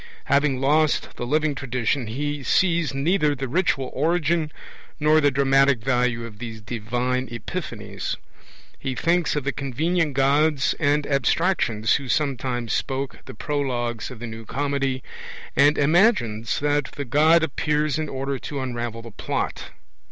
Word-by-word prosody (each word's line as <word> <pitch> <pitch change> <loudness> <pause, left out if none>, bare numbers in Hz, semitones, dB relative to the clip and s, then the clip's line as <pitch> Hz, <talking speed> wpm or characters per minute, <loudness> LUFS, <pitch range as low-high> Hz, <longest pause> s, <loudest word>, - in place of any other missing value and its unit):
Having 140 -2 +2
lost 150 +3 +2
the 120 - -5
living 155 +2 +1
tradition, 130 -1 -1
he 145 +5 -3
sees 170 +2 +2
neither 150 +2 +1
the 135 0 -4
ritual 135 -3 0
origin 160 +1 +1 0.5
nor 155 +1 +4
the 145 - +5
dramatic 135 0 +4
value 125 0 0
of 105 -2 -11
these 115 -2 -6
divine 120 +3 -2
epiphanies. 115 -2 -5 0.6
He 135 -2 -3
thinks 170 +3 +1
of 145 - -1
the 140 - 0
convenient 150 +3 -1
gods 140 +2 +3
and 145 -1 +2
abstractions 140 - +1
who 135 - -7
sometimes 125 -5 -1
spoke 135 0 -2
the - - -9
prologues 120 -6 -2
of 125 - -9
the 120 - -6
New 115 -1 -7
Comedy, 135 +1 -1 0.5
and 145 +2 +5
imagines 145 - +2
that 145 -1 +1
the 145 - -5
God 155 +6 +4
appears 150 0 0
in 155 -1 -2
order 135 0 -3
to 145 - -5
unravel 120 -3 -4
the 115 - -10
plot. - - -3
140 Hz, 145 wpm, -24 LUFS, 125-150 Hz, 0.6 s, the